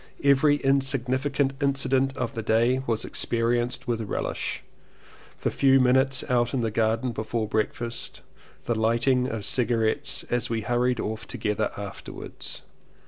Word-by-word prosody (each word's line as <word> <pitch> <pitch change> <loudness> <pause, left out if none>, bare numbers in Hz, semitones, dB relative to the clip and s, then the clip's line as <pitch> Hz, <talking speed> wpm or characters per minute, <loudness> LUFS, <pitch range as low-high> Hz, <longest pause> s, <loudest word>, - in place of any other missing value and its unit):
Every 140 +1 +5
insignificant 135 0 +1
inci 140 -1 +1
dent 135 +1 +1
of - - -2
the 115 - -3
day 115 +4 +2
was 115 -2 0
experienced 120 +1 0
with 115 -2 0
relish 105 - -3 0.4
— - - -24
the - - +1
few 135 -1 +4
minutes 130 +1 +3
out 120 0 +1
in 130 - 0
the 115 -1 -1
garden 115 +3 +1
before 110 0 -2
breakfast 115 +2 -3 0.2
— - - -27
the 120 - +1
lighting 115 +3 +2
of 110 -5 -4
cigarettes 115 -2 0
as 120 0 0
we 115 -1 -1
hurried 120 +2 +1
off 110 +1 -4
together 105 0 -1
afterwards. 100 -1 -8
120 Hz, 145 wpm, -26 LUFS, 115-135 Hz, 0.4 s, Every